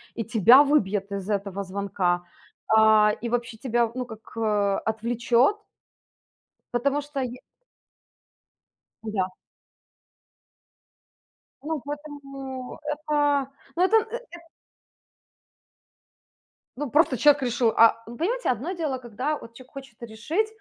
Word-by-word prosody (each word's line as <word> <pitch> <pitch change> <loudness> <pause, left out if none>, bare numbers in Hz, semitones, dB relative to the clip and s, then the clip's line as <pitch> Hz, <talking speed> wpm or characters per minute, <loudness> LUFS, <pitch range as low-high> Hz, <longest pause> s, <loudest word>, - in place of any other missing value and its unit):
и 230 - -2
тебя 230 +6 +7
выбьет 205 -9 +1
из 200 0 -5
этого 200 -1 -2
звонка, 185 -2 -1 0.4
а, 220 -1 +5
и 235 - -3
вообще 240 -1 -2
тебя, 235 -1 0
ну, 250 0 -4
как, 220 -2 -13
а, 205 -3 +1
отвлечет. 235 - +1 1.2
Потому 280 +4 +1
что 285 -1 -5
я 250 0 -5 1.6
Да. 210 -4 -1 2.4
Ну, 310 -2 -3
поэтому 275 -3 -7
это, 295 -2 0 0.3
ну, 350 - +2
это, 400 +4 +4 0.2
э, - - -4
эт 340 - -10 2.4
ну, 290 0 -3
просто 290 -1 +3
человек 290 +3 +5
решил, 240 -2 +1
а 230 0 +5
ну, 235 - -8
понимаете, 475 +10 -1
одно 255 - -1
дело, 305 -7 -3
когда 255 +5 -3
вот 230 - -13
человек 255 +1 -15
хочет 265 -5 -11
решить. 235 - -2
245 Hz, 115 wpm, -25 LUFS, 220-290 Hz, 2.4 s, тебя